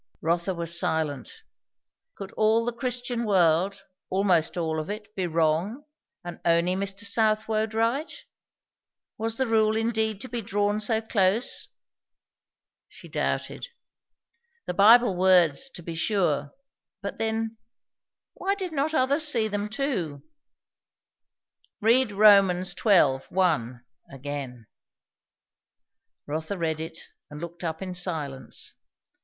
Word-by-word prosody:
Rotha 170 +3 0
was 170 0 -1
silent. 160 - -2 0.7
Could 195 -1 -8
all 220 +1 +2
the 240 - -1
Christian 245 -1 -3
world, 190 -1 +2 0.3
almost 185 -4 +1
all 160 -2 -1
of 155 - -5
it, 210 0 -7
be 185 -2 -1
wrong, 165 - 0 0.4
and 175 -1 -8
only 170 +2 +3
Mr. 200 +2 -3
Southwode 220 -1 +1
right? 235 +8 0 1.1
Was 225 +1 -2
the 265 - +1
rule 220 -2 +2
indeed 220 -2 0
to 260 - -5
be 240 -2 -4
drawn 205 0 0
so 220 +1 +1
close? 210 +1 +1 1.2
She - - -13
doubted. - - -3 1.0
The - - -3
Bible 215 +2 +6
words, 180 - +4
to 180 -10 -11
be 170 - -6
sure, 165 -5 0 0.5
but - - -5
then, 225 0 -2 0.8
why 395 +1 -1
did 375 -3 -5
not 305 +2 0
others 285 +4 +2
see 230 -7 +1
them 205 0 -3
too? 200 - -3 1.6
"Read 235 +2 +3
Rom. 200 -1 +7
xii. 185 +4 -2 0.4
1, 130 -10 0 0.3
again." 135 -3 -6 1.6
Rotha 160 +6 -4
read 160 -2 -1
it, 160 0 -6 0.3
and 150 - -9
looked 170 +2 -8
up 160 +2 -3
in 185 -1 -5
silence. 160 -7 -2
200 Hz, 120 wpm, -26 LUFS, 170-225 Hz, 1.6 s, Rom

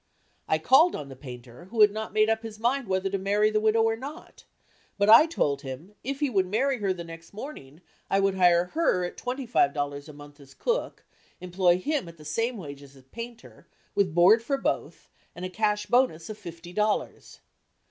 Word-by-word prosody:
I 160 - +2
called 270 - +5
on 145 -2 -7
the 135 - -9
painter 125 +2 -11
who 220 +4 -1
had 210 -1 +7
not 220 +1 -5
made 215 0 +3
up 220 0 +1
his 225 -2 -8
mind 245 +3 0
whether 190 0 0
to 195 0 -2
marry 205 +2 +2
the 215 - +2
widow 220 +1 +3
or 225 0 +2
not, 280 +7 -10 0.5
but 200 +1 +2
I 235 +9 +9
told 140 - -1
him 145 +8 -8
if 275 +3 -4
he 295 - +3
would 195 -7 +1
marry 255 +6 0
her 200 -2 0
the 180 -2 -4
next 165 +1 -12
morning 185 - -9 0.3
I 195 - +2
would 195 0 +2
hire 175 -2 +4
her 245 - +1
at 175 - -6
twenty 255 +2 -4
five 155 - +2
dollars 145 0 -4
a - - -10
month 145 0 -14
as 135 -1 -16
cook, - - -2 0.3
employ 180 -1 +2
him 285 - -2
at 170 - -14
the 155 - -14
same 230 +10 -1
wages 140 -5 -10
as 135 - -17
painter, 235 0 -10 0.3
with 190 -6 +1
board 190 +6 +6
for 275 +4 -1
both, - - -3 0.3
and 180 - -6
a - - -4
cash 210 +1 0
bonus 235 -8 +1
of 215 - -8
fifty 170 +1 -10
dollars. 210 +2 -2
195 Hz, 210 wpm, -27 LUFS, 165-230 Hz, 0.5 s, I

